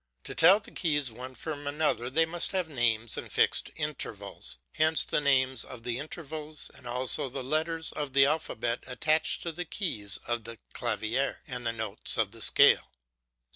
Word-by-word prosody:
To - - -6
tell 185 +5 +6
the 200 - -14
keys 145 - 0
one 130 +3 -9
from 145 +2 -6
another 145 -5 0
they 165 +5 +3
must 170 +4 -2
have 185 -3 -1
names 115 -5 +3
and - - -9
fixed - - +3
intervals; - - -3 0.2
hence 155 0 +3
the - - 0
names 130 -3 +2
of 120 -3 -10
the 120 +1 -3
intervals, 155 0 -7
and 130 -2 -12
also 125 +2 +1
the 130 +1 -4
letters 160 +4 0
of 145 -3 -5
the 135 0 +6
alphabet 120 -6 -1
attached 155 +5 0
to 170 - -3
the 175 +2 -5
keys 130 - -3
of 120 -2 -2
the 115 0 -8 0.2
clavier 120 +3 -2
and 125 -1 -4
the - - +1
notes 110 -2 +1
of 110 -3 +1
the 115 0 -10
scale. - - +5
135 Hz, 175 wpm, -28 LUFS, 120-155 Hz, 0.2 s, tell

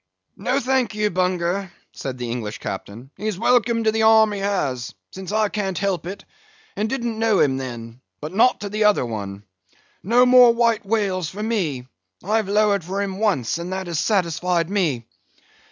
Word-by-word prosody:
"No, 255 +2 0
thank 255 -4 0
ye, 210 0 +1
Bunger," 180 0 -1 0.2
said 130 -2 -6
the 120 -1 -4
English 110 -3 -4
Captain, 110 +7 -7
"he's 210 -1 -3
welcome 235 +1 +2
to 220 - +3
the 220 0 0
arm 220 -1 +6
he 205 - -4
has, 145 - -2 0.2
since 190 0 -7
I 215 0 +2
can't 195 -4 -3
help 190 -3 -1
it, 195 +2 -7 0.5
and 210 +2 -1
didn't 235 -4 -3
know 225 -3 +2
him 135 -2 +3
then; 120 -2 -7 0.2
but 155 +4 -7
not 225 +5 +3
to - - -4
another 210 -9 +3
one. 100 -3 -6 0.6
No 240 +6 +4
more 250 -2 +7
White 230 -3 +1
Whales 195 -6 0
for 210 +2 -6
me; 170 - -1 0.4
I've 215 0 0
lowered 205 -2 +2
for 190 +4 -4
him 195 -1 -3
once, 175 - 0
and 175 +2 -5
that 190 0 -3
has 170 -3 -2
satisfied 180 -3 0
me. 155 - 0
195 Hz, 175 wpm, -22 LUFS, 160-220 Hz, 0.6 s, more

